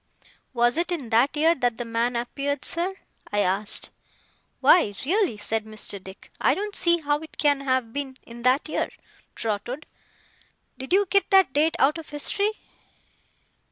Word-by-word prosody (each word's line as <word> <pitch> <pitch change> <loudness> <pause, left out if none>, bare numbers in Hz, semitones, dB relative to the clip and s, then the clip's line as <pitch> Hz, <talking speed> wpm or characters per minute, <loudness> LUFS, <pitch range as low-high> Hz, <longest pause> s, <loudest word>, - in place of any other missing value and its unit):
'Was 240 +2 +2
it 345 +1 +1
in 285 -10 -3
that 245 +6 +3
year 320 +2 +4
that 245 -6 -1
the 240 - -4
man 230 +2 -1
appeared, 275 +4 -3
sir?' 355 +3 0 0.4
I 205 0 +1
asked. 200 +2 +2 0.7
'Why, 210 - +4
really' 365 - +1
said 220 +1 -2
Mr. 215 -3 -6
Dick, 190 +1 -13
'I - - +3
don't 415 +1 -4
see 340 0 +5
how 290 0 0
it 315 0 -13
can 290 -2 +2
have 260 -4 -1
been 275 -2 -4
in 235 0 -11
that 255 +5 +2
year, 310 - -2 0.5
Trotwood. 230 +6 -4 0.9
Did 265 +4 -8
you 400 +2 +4
get 395 +2 +2
that 385 -8 +5
date 315 +3 +3
out 300 +3 +2
of 320 - -11
history? 400 +8 0
275 Hz, 160 wpm, -25 LUFS, 235-330 Hz, 0.9 s, see